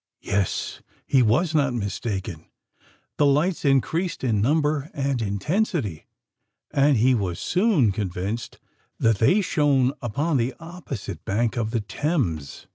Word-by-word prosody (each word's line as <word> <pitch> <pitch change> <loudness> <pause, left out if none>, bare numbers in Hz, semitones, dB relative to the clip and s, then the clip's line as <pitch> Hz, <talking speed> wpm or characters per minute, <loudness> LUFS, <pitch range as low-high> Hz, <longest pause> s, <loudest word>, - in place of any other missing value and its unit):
Yes: 100 -2 -1 0.2
he 135 - +3
was 130 +9 +2
not 140 -5 +2
mistaken! 100 -5 -4 0.7
The 145 - +4
lights 155 +6 +1
increased 160 +6 +1
in 110 -5 +1
number 150 +3 +1
and 135 -4 -1
intensity; 110 - -1 0.6
and 140 -1 +3
he 125 +4 +4
was 95 -7 -1
soon 180 - +2
convinced 100 +3 -4 0.4
that 115 -3 +2
they 185 - +4
shone 140 -7 +2
upon 140 +6 0
the 125 +1 -1
opposite 165 - -7
bank 115 +4 0
of 115 -3 -1
the 115 0 -1
Thames. 105 - -2
130 Hz, 125 wpm, -24 LUFS, 105-150 Hz, 0.7 s, The